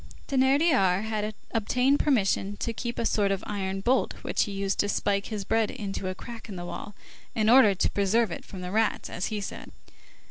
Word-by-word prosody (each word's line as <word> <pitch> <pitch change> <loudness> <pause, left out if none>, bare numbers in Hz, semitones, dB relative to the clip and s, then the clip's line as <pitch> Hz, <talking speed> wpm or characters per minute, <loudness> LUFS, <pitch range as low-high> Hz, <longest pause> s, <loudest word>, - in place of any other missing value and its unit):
Thénardier 265 - +3
had 215 -1 -2 0.2
obtained 250 +5 +2
permission 205 -6 +1
to 230 - -3
keep 235 +1 -4
a 230 - -1
sort 205 -3 +2
of 195 0 -2
iron 195 -2 -3
bolt 250 +6 +1
which - - +1
he 205 - -6
used 195 0 -2
to 205 - +2
spike 200 -1 0
his 210 -3 -4
bread 225 +1 +1
into 195 -2 -4
a 185 - -3
crack 230 +3 -9
in 200 - -6
the 175 -1 -6
wall, 205 +3 -7 0.4
"in 220 0 +3
order 240 -6 +7
to - - +1
preserve 205 +1 +2
it - - -6
from 190 - -9
the 180 0 -5
rats," 220 +1 0
as 180 - -2
he 215 - -3
said. 200 - -7
210 Hz, 205 wpm, -27 LUFS, 195-230 Hz, 0.4 s, order